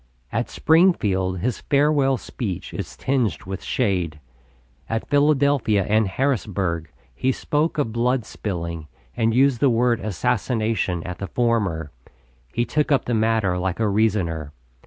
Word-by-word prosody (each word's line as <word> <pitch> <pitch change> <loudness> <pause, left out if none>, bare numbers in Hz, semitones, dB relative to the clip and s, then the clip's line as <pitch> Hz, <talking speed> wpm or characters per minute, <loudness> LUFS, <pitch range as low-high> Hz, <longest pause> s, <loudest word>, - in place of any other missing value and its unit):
At - - -1
Springfield 100 - +2
his 125 +1 -2
farewell 140 -2 +2
speech 95 -7 -5
is - - -6
tinged 125 - 0
with 95 +1 -6
shade. 90 -10 -1 0.7
At 115 0 -2
Philadelphia 140 -8 +3
and 110 0 +3
Harrisburg 95 - -1 0.2
he 130 - 0
spoke 150 +5 -1
of 140 -7 0
blood 120 0 +1
spilling, 85 -7 -5 0.3
and 115 0 +1
used 135 -1 +4
the 140 - +4
word 120 0 +2
"assassination" 110 -3 -1
at 90 -1 -6
the 100 - -4
former. 100 -10 0 0.6
He 120 - 0
took 150 +2 0
up 140 - +3
the 120 - -1
matter 110 -5 +1
like 95 +1 -2
a 110 - +2
reasoner. 95 -8 0
110 Hz, 135 wpm, -23 LUFS, 95-130 Hz, 0.7 s, used